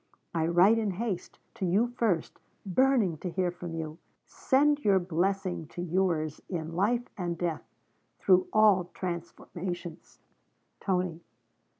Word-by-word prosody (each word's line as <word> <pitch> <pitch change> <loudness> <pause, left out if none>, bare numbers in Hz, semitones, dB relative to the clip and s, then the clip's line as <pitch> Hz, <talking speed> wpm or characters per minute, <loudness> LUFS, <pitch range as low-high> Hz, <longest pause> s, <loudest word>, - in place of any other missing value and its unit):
I 165 -1 +1
write 185 +7 +5
in 215 -2 0
haste, 195 -1 -4 0.2
to - - -6
you 190 +6 +3
first, 190 -10 0 0.3
burning 205 - +2
to 180 - -4
hear 180 0 0
from 175 -1 -7
you. 160 0 -5 0.3
Send 290 +2 +2
your 200 -2 +5
blessing 180 -1 -1
to 175 - -7
yours 170 -4 0
in 165 -3 -4
life 235 +6 +1
and 175 -2 -2
death, 170 -2 -2 0.6
through 185 -1 +4
all 210 -4 +5
transformations, 175 -1 -6 0.6
'TONY.' 180 -3 -1
180 Hz, 125 wpm, -29 LUFS, 170-200 Hz, 0.6 s, write